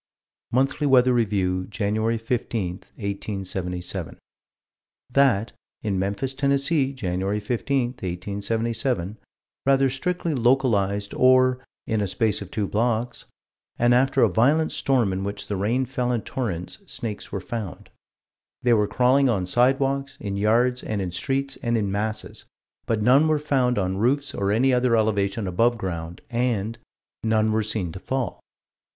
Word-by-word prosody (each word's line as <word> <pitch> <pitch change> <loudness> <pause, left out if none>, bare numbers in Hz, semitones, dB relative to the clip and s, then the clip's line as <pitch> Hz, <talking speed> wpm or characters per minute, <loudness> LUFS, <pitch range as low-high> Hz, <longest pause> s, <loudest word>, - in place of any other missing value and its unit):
Monthly 135 +4 +1
Weather 130 -2 +5
Review, 95 -5 0
Jan. 110 +3 0
15, 115 -4 -2
1877: 95 -2 -5 0.9
That, 125 -6 +3 0.3
in 100 -4 0
Memphis, 100 +8 -2
Tenn., 140 +1 +2
Jan. 130 - 0
15, 125 +5 0
1877, 105 +1 -2 0.5
rather 135 -1 +4
strictly 170 +4 -2
localized, 115 -6 +1
or 130 0 +4 0.2
"in 110 -1 0
a 100 - 0
space 105 +2 0
of 100 - -7
two 105 -1 -2
blocks," 115 +2 -1 0.5
and 120 +1 +4
after 135 +2 +3
a - - +6
violent 145 - +3
storm 125 -8 +1
in 95 +1 -3
which 100 +1 -4
the 105 - -2
rain 115 +7 0
"fell 125 -1 -1
in 115 -4 -1
torrents," 90 -9 -4
snakes 110 -3 -5
were 100 - -2
found. 110 -2 -6 0.7
They 120 -1 +4
were 105 -2 +3
crawling 130 +4 +3
on 100 -6 0
sidewalks, 135 +5 +1
in 100 -2 -4
yards, 120 +5 +2
and 105 -2 -3
in 95 -2 -3
streets, 135 +7 -2
and 120 -1 0
in 100 -3 -1
masses 110 +2 -3 0.4
but 110 -2 0
"none 135 +7 +5
were 155 -1 +3
found 130 -5 +1
on 95 -1 0
roofs 140 +5 +1
or 100 0 0
any 130 +5 +3
other 125 -2 +3
elevation 105 -1 0
above 115 +7 +2
ground" 85 -4 -5
and 115 -2 -1 0.4
"none 110 -1 +2
were 110 +1 +2
seen 105 -5 -2
to 95 - -8
fall." 130 -1 -3
115 Hz, 145 wpm, -24 LUFS, 100-130 Hz, 0.9 s, a